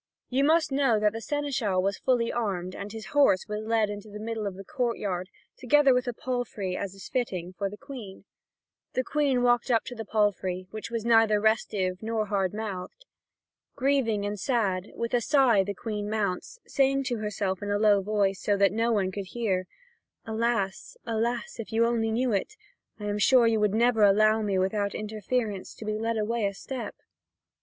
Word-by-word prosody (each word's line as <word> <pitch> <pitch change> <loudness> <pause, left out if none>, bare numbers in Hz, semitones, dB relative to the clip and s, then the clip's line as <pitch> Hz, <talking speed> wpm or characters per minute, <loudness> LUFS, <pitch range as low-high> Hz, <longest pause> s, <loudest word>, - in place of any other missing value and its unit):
You 265 +2 +2
must 310 0 +3
know 270 -5 +3
that 210 0 +2
the 225 - -5
seneschal 260 -9 -1
was 195 +2 0
fully 245 -3 +1
armed, 185 -6 -2
and 200 +1 -6
his 220 0 -7
horse 280 -10 +4
was 210 0 -3
led 225 -2 +2
into 205 +1 -7
the 210 - -8
middle 220 -1 -3
of 195 - -5
the 195 - -9
courtyard, 195 -6 -2 0.3
together 275 +1 +4
with 250 0 0
a - - +1
palfrey, 230 -7 -3
as 195 0 -4
is 195 - -10
fitting, 185 -9 -2
for 195 +2 -2
the 210 - -10
Queen. 235 -9 -10 0.7
The 255 - 0
Queen 275 -3 +1
walked 240 +1 +3
up 230 -2 +3
to 250 - -6
the 225 -2 -6
palfrey, 195 -4 0
which 215 +1 -6
was 230 -1 -3
neither 225 -2 +5
restive 205 -4 0
nor 220 -1 -1
hard 195 -3 0
mouthed. 215 - -6 0.7
Grieving 255 -7 +1
and 205 0 -3
sad, 200 -5 0
with 235 +1 -3
a 245 - +3
sigh 245 -6 +4
the 200 +1 -4
Queen 210 -1 -4
mounts, 210 - -2
saying 275 0 +2
to 245 -2 -2
herself 205 -3 -2
in 205 - -4
a 205 - +1
low 205 -1 +4
voice, 200 -1 0
so 205 -1 +1
that 200 0 +4
no 230 +2 +1
one 195 -4 +1
could 195 0 -5
hear: 190 -5 -1 0.6
"Alas, 220 -3 -1
alas, 235 +1 -2
if 230 - -6
you 225 +1 +3
only 230 -1 +1
knew 240 +3 +1
it, 210 - -1 0.4
I 210 - -6
am 205 0 -1
sure 250 +2 +5
you 225 -1 +3
would 210 -1 +2
never 235 -1 +3
allow 215 +2 +5
me 200 -3 0
without 200 +2 0
interference 215 -1 -3
to 220 - -9
be 215 0 -2
led 225 0 -1
away 220 0 0
a 200 - -5
step." 260 +4 -6
215 Hz, 195 wpm, -27 LUFS, 200-240 Hz, 0.7 s, neither